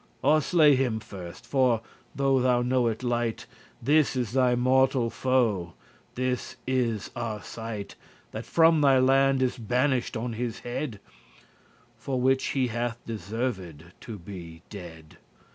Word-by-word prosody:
Or 155 0 +4
slay 150 -2 +5
him 125 -4 0
first; 95 -6 -10
for, 125 -5 +2 0.3
though 135 -1 +2
thou 125 -1 +3
know 125 -1 +2
it 115 +2 -3
lite*, 120 -2 -1
*little - - -26
This 150 -1 +3
is 125 -4 -1
thy 125 -1 +3
mortal 130 -1 +2
foe, 110 -10 +1 0.4
this 125 0 -2
is 120 -5 -1
Arcite 110 -2 -5 0.4
That - - -7
from 165 -1 +4
thy 135 -2 +5
land 135 +1 +4
is 130 0 -1
banisht 125 +2 0
on 120 +1 -3
his 115 0 -4
head, 120 -2 -4 1.0
For 130 +2 -2
which 130 +1 +2
he 130 -2 +2
hath 120 +1 -2
deserved 100 - -4 0.2
to 110 -3 -7
be 85 -3 -10
dead. 80 -6 -10
120 Hz, 140 wpm, -27 LUFS, 110-130 Hz, 1.0 s, slay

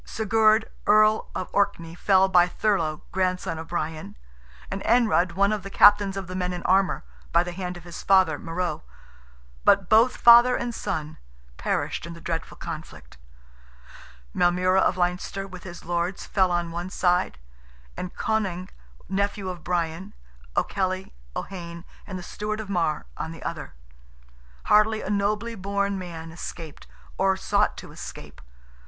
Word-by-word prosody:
Sigurd, 220 0 +2 0.2
Earl 215 +1 +4
of 185 - -3
Orkney, 170 -5 0
fell 190 +2 +4
by 180 -2 +5
Thurlogh, 170 -6 0
grandson 185 -2 -1
of 160 - -7
Brian; 155 - -4 0.5
and - - -3
Anrud, 185 -7 +3
one 200 +3 +2
of 210 - -2
the 195 - -8
captains 205 -1 +5
of 195 - -4
the 185 - -8
men 180 -1 -1
in 175 - -6
armour, 190 +1 +2 0.3
by 170 +1 +4
the 175 - -5
hand 180 0 -5
of 175 - -12
his 175 -1 -8
father, 190 -6 +4
Morrogh; 170 -1 -3 0.8
but 195 -2 +4
both 225 +3 +5
father 240 +1 +8
and 240 0 -3
son 155 -7 -4 0.4
perished - - -2
in 170 - -8
the - - -11
dreadful 165 0 -4
conflict; 150 - -9 1.1
Maelmurra 180 +2 +3
of 185 - +2
Leinster, 180 +2 -1
with 185 -2 -10
his 175 -2 -9
lords, 175 +2 -2
fell 190 -2 +2
on 175 -1 -1
one 175 +2 -4
side, 180 -1 +1 0.6
and 180 - -6
Conaing, 190 -5 -1 0.4
nephew 200 0 -1
of 175 -3 -7
Brian, 175 +2 -2 0.4
O'Kelly, 185 -1 -1 0.2
O'Heyne, 170 -2 -6 0.2
and 190 - -5
the 180 - -7
Stewart 215 +4 -4
of 210 -2 -6
Marr, 165 - 0
on 160 - -4
the 165 - -10
other. - - -6 0.9
Hardly 215 +1 +3
a - - -3
nobly 210 +3 0
born 200 -1 -1
man 165 -3 -7
escaped, 165 -2 -8 0.3
or 190 0 +3
sought - - +1
to - - -10
escape. - - -10
185 Hz, 150 wpm, -25 LUFS, 170-200 Hz, 1.1 s, father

